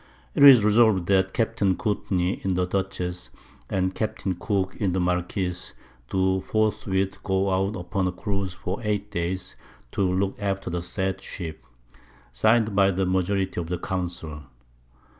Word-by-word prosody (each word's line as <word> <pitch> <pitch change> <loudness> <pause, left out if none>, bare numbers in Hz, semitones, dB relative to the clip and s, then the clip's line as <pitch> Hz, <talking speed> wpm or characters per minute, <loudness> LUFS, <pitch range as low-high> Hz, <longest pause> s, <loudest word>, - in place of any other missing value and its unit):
It - - +3
is 130 -7 +10
resolved 105 -4 +4
that 95 -1 +3
Capt. 115 -2 -1 0.2
Courtney 95 -3 -1
in 95 -1 0
the 90 0 +1
Dutchess, 90 -1 -3 0.4
and 95 -1 0
Capt. 110 +1 -3 0.2
Cooke 95 -1 -1
in 95 -4 0
the 95 - 0
Marquiss, 90 0 -2 0.3
do 95 0 +1
forthwith 100 -2 0
go 95 0 0
out 95 +2 0
upon 95 +1 -1
a - - 0
Cruise 95 -1 -3
for 90 +1 -4
8 105 -2 -2
Days, 90 0 -3 0.4
to - - -2
look 95 +1 0
after 95 -2 -2
the 85 0 -2
said 95 +1 -3
Ship. 80 -7 -7 0.7
Signed 110 - +3
by 100 -1 +5
the 95 0 0
Majority 95 0 0
of 85 - -6
the 90 +1 -2
Council. 85 -4 -4
95 Hz, 150 wpm, -25 LUFS, 90-100 Hz, 0.7 s, is